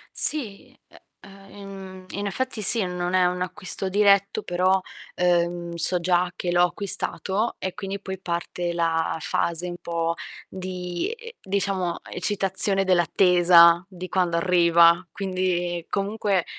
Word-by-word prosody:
Sì, 230 -10 +3
e - - -19 0.2
ehm, 195 0 -14
mhmm, 190 -1 -10
in 200 +1 -4
effetti 240 +3 -3
sì, 215 +2 +4
non 180 0 -3
è 185 -1 +3
un 180 0 -1
acquisto 185 +1 -3
diretto, 200 +1 +2
però, 185 +2 +1 0.3
ehm, 175 -1 0
so 170 +2 +4
già 180 +1 +1
che 180 -1 -3
l'ho 175 0 +3
acquistato 200 +3 -1
e 185 - -4
quindi 195 0 -6
poi 190 -1 -7
parte 175 -1 -4
la 165 -1 -1
fase 170 +2 -1
un 175 0 -6
po' 165 0 -2 0.3
di 180 - -5
e 470 0 -11
diciamo, 190 -2 -2
eccitazione 195 +1 0
dell'attesa 175 -1 +4
di 185 -2 -9
quando 180 -2 0
arriva. 170 0 +4
Quindi 180 -3 -2
comunque, 200 -2 -1
185 Hz, 135 wpm, -23 LUFS, 175-195 Hz, 0.3 s, sì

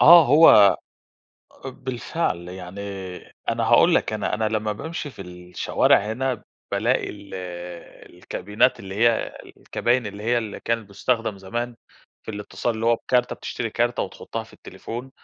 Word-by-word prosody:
آه 170 0 +10
هو 150 +5 +8 0.9
بالفعل 130 - -3
يعني، 90 +2 -8 0.7
أنا - - +1
هاقول - - +5
لك، - - +1
أنا 105 0 -1
أنا 110 +1 -1
لما 110 -1 -1
بامشي 155 +5 -5
في 100 - -9
الشوارع 90 0 +1
هنا، 115 +3 -2 0.3
بالاقي 115 +6 +1
ال 100 -2 -11 0.8
الكابينات، 105 +7 0
اللي 95 -1 -7
هي 115 +2 +2 0.2
الكباين، 120 -1 0
اللي 105 0 -7
هي 120 +2 +2
اللي 110 -3 -5
كانت 115 -3 -2
بتستخدم 115 0 -1
زمان 120 +5 -4 0.5
في - - -7
الاتصال، 110 +3 -3
اللي 110 +1 -2
هو 115 - +5
بكارت، 125 +1 +1
بتشتري 115 -2 -4
كارت 120 +2 0
وتحطها - - -5
في - - -19
التليفون، 125 +3 -8
115 Hz, 140 wpm, -24 LUFS, 100-125 Hz, 0.9 s, آه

